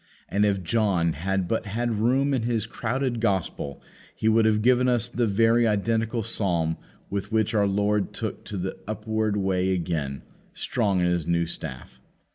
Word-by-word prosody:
And 105 +1 +2
if 100 -2 0
John 90 -5 +1
had 95 +3 -1
but 110 +1 -1
had 115 +1 -1
room 135 +5 +2
in 130 - +1
his 115 -2 0
crowded 125 +2 -2
gospel 95 -9 -1 0.3
he 110 - -1
would 110 0 +4
have 105 -1 +2
given 125 +1 +4
us 120 -2 +2
the 120 -1 0
very 115 +3 +3
identical 115 +2 0
psalm 85 -7 0 0.3
with 100 +1 -3
which 110 0 +1
our 105 -2 +3
Lord 100 0 +1
took - - -5
to 105 - -5
the 95 +1 -4
upward 110 -1 -1
way 95 -1 +1
again, 80 -7 -2 0.3
strong 100 -3 0
in - - +2
His 85 -2 0
new 85 0 +2
staff. 65 -6 -7
105 Hz, 170 wpm, -25 LUFS, 90-115 Hz, 0.3 s, would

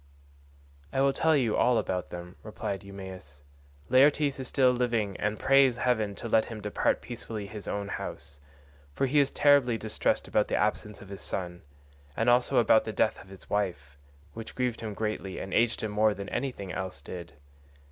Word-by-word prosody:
"I - - -1
will 135 0 +3
tell 160 +1 +3
you 120 -6 +1
all 125 -1 +3
about 90 -4 -2
them," 90 +1 -8
replied 105 -2 -5
Eumaeus, 95 -7 -10 0.4
"Laertes 140 +2 +4
is 130 - -4
still 130 0 +4
living 115 -5 0
and 105 +1 -2
prays 135 -2 +4
heaven 110 -5 0
to 115 - -6
let 110 -1 +3
him 115 -2 -7
depart 105 0 0
peacefully 115 -3 -6
in 100 - -10
his 105 -2 -8
own 100 -1 -3
house, 70 -7 -7 0.6
for - - +1
he 145 +3 +3
is 140 -1 +3
terribly 140 -5 +4
distressed 110 0 -1
about - - +2
the - - -1
absence 105 -1 -1
of 100 - -14
his 100 -1 -8
son, 90 -2 -4 0.6
and 115 +2 +3
also 120 0 +3
about - - +5
the - - -4
death - - +1
of 95 - -16
his 95 -1 -12
wife, 85 -9 -2 0.4
which 115 0 -8
grieved 125 -2 -1
him 110 -2 -5
greatly 105 -4 -3
and 95 - -6
aged 115 0 +2
him 110 - -2
more 105 0 +3
than 100 +1 -6
anything 120 -9 -4
else 95 +1 -4
did. 85 -4 -8
110 Hz, 190 wpm, -28 LUFS, 95-125 Hz, 0.6 s, about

